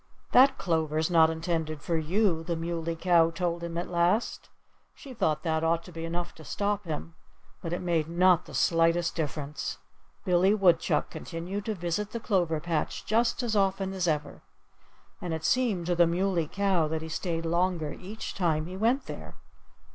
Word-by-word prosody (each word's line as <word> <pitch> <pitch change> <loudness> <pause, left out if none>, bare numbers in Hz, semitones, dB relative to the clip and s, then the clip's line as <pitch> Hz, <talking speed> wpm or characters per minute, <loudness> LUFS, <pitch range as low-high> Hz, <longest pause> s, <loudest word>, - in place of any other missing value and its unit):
"That 265 +2 +6
clover's 160 -2 0
not 160 -2 +6
intended 160 -1 -2
for 170 - -1
you," 165 +1 +1
the 170 0 -2
Muley 165 0 -3
Cow 165 -1 +4
told 170 0 -2
him 170 0 -4
at 175 - -2
last. 175 +6 0 0.5
She 270 - -11
thought 155 -10 0
that 160 -2 0
ought 165 +1 +1
to 180 - -12
be 165 -1 -6
enough 175 +1 -4
to 160 - -13
stop 205 +4 -2
him. 165 +1 -5 0.5
But 165 - -5
it 175 - -3
made 165 -3 0
not 180 0 +4
the - - -10
slightest 165 0 +2
difference. 150 -2 -4 0.5
Billy 185 +2 +4
Woodchuck 180 -5 +2
continued 185 +4 -5
to 220 - -2
visit 180 +4 -3
the 235 - -2
clover 175 -8 0
patch 165 -1 -2
just 230 +3 +1
as 225 -3 -1
often 195 -1 +1
as 185 -2 -1
ever. 150 -2 -2 0.8
And 175 -2 -2
it 160 0 -6
seemed 220 -6 +1
to 175 - +1
the 170 -1 +4
Muley 175 -1 0
Cow 190 -3 +1
that 160 +1 -3
he - - -6
stayed 165 +1 -3
longer 170 -2 0
each 205 +4 -7
time 160 -4 0
he 180 +2 -7
went 235 +7 +1
there. - - -8
170 Hz, 175 wpm, -28 LUFS, 165-190 Hz, 0.8 s, That